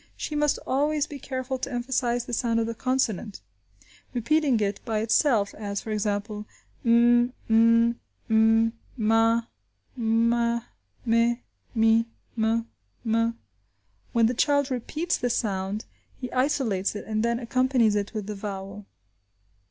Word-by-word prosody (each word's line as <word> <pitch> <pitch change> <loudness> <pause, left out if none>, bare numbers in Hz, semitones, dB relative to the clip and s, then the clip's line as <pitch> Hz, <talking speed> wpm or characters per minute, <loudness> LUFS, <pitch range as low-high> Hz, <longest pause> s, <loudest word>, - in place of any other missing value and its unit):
She - - -4
must 295 -1 +2
always 295 +2 +1
be 290 -2 -9
careful 260 0 -4
to 275 - -4
emphasize 245 -1 -1
the - - -7
sound 230 0 +1
of 225 - +1
the 230 - -3
consonant, 230 -4 -1 0.8
repeating 275 +1 +2
it 200 -1 -1
by 220 -1 -2
itself, 225 -2 +2
as, 200 -2 -4
for 220 - -7
example, 210 0 -2 0.4
m, 240 +1 +4
m, 230 +1 +4 0.3
m, 225 0 +4 0.2
ma, 225 +1 +3 0.5
me, 235 0 +1 1.1
mi, 225 0 +4 0.3
m, 225 0 0 0.4
m. 230 +1 +1 0.7
When 230 -1 +3
the 235 - +2
child 285 +2 +2
repeats 305 +8 -1
the 245 - 0
sound 205 -3 -2 0.3
he 250 -2 -5
isolates 255 -8 0
it, 205 - -6
and 215 0 -1
then 235 +1 +1
accompanies 250 -2 +2
it 205 -1 -1
with 210 -2 -3
the 210 - -4
vowel. 195 0 -7
230 Hz, 130 wpm, -26 LUFS, 215-250 Hz, 1.1 s, m